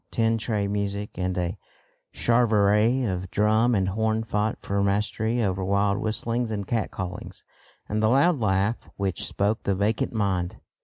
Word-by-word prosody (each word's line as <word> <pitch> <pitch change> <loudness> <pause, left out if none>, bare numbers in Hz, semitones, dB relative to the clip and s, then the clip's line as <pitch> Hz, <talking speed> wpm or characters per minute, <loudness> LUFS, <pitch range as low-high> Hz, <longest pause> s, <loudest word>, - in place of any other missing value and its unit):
Tin 115 0 +1
tray 105 -2 -1
music 100 0 -2
and 90 0 -2
a 90 +2 -2 0.5
charivari 115 +1 +3
of 95 -4 -2
drum 110 +4 +3
and 95 -2 +1
horn 110 +2 0
fought 105 -1 -1
for 100 0 -1
mastery 105 +4 0
over 95 -2 -1
wild 100 +1 +1
whistlings 115 +2 -1
and 100 -2 -3
cat 115 +1 -1
callings 90 -1 -7 0.4
and 110 0 -1
the 110 - +3
"loud 140 +5 +4
laugh 100 +1 0
which 95 -3 -2
spoke 105 +2 0
the 100 - 0
vacant 105 +3 0
mind." 95 -5 -1
105 Hz, 155 wpm, -25 LUFS, 100-115 Hz, 0.5 s, loud